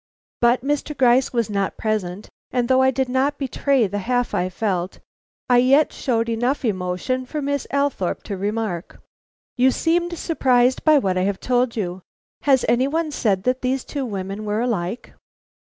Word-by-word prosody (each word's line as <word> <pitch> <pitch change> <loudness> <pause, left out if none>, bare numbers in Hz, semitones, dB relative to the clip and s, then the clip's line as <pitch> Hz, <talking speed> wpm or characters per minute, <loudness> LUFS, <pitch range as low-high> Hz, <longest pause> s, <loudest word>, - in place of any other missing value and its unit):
But 240 +1 +3
Mr. 295 +1 -2
Gryce 255 0 +4
was 235 -3 0
not 200 -2 -2
present, 210 -3 -2 0.2
and 245 -1 0
though 260 +1 +4
I 260 - +5
did 265 0 0
not 265 +3 0
betray 275 -2 +1
the 205 +1 -3
half 245 +4 -1
I 180 - 0
felt. 185 -2 -2 0.5
I 245 -1 +5
yet 275 +5 +4
showed 230 -3 -1
enough 245 +4 -1
emotion 185 +5 -1
for 300 - -4
Miss 285 -1 -2
Althorpe 280 -10 -1
to 200 - -5
remark: 200 -3 -3 0.6
"You 255 +1 +5
seemed 345 +5 0
surprised 255 -6 +2
by 310 -1 +6
what 190 -8 +1
I - - +1
have 195 -1 -1
told 250 -1 0
you. 185 -4 -3 0.5
Has 265 -2 +4
any 250 +3 +3
one 315 +1 -1
said 200 -9 0
that 255 +1 0
these 260 0 -1
two 285 -2 -4
women 195 0 -5
were 210 +1 -1
alike?" 220 -3 -3
245 Hz, 175 wpm, -22 LUFS, 205-265 Hz, 0.6 s, by